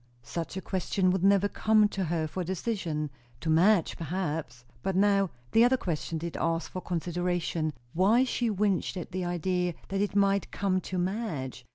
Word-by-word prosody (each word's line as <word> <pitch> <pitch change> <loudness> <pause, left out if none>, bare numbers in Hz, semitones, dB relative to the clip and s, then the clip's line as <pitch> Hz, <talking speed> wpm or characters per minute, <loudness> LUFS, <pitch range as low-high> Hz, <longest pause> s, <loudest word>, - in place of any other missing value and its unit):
Such 165 +7 -5
a - - -3
question 185 0 0
would 190 -1 0
never 200 0 +5
come 215 +1 +3
to 195 -2 -2
her 165 -1 0
for 180 +4 -3
decision. 170 -5 -2 0.3
To 160 - 0
Madge, 175 +2 +4
perhaps? 155 -7 -3 0.2
But 190 +5 -1
now 195 -1 +3 0.2
the 225 - +6
other 255 +2 +4
question 165 -5 -3
did 170 +1 -5
ask 165 0 -1
for 185 - -5
consideration; 175 -2 -1 0.2
Why 205 +8 +4
she 245 -2 0
winced 200 -2 0
at 175 - -6
the 185 -1 -2
idea 175 0 -1
that 195 +1 -1
it 205 0 -1
might 200 -1 +2
come 185 -2 0
to 185 - -4
Madge? 175 - -3
185 Hz, 175 wpm, -29 LUFS, 165-200 Hz, 0.3 s, the